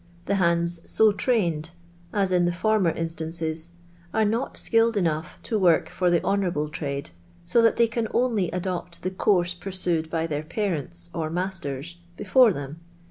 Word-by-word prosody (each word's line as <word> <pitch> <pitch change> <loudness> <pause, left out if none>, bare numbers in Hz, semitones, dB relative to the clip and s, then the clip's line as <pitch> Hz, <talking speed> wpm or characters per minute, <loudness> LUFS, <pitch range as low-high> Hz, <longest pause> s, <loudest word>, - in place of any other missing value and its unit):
The - - 0
hands 170 0 +2
so 220 -1 +5
trained 175 -8 0 0.4
(as 195 -2 +1
in 180 -1 +3
the 175 - +2
former 200 +1 +2
instances) 165 0 -4 0.5
are 220 -1 +3
not 230 +5 -1
skilled 230 -1 +3
enough 165 -2 -1
to 220 - -1
work 175 -4 +3
for 180 -1 0
the 170 -1 +2
honourable 175 -7 0
trade, 140 - -4 0.3
so 235 - +3
that 230 -1 +4
they 235 - +4
can 230 0 -2
only 225 -8 +1
adopt 180 -1 -4
the 185 - -1
course 180 -2 +2
pursued 175 -3 -2
by 165 0 -1
their 150 -2 -2
parents, 155 - -3
or 155 -1 -2
masters, 170 -3 -3 0.2
before 220 +4 +5
them. 145 -1 -6
175 Hz, 160 wpm, -25 LUFS, 160-200 Hz, 0.5 s, so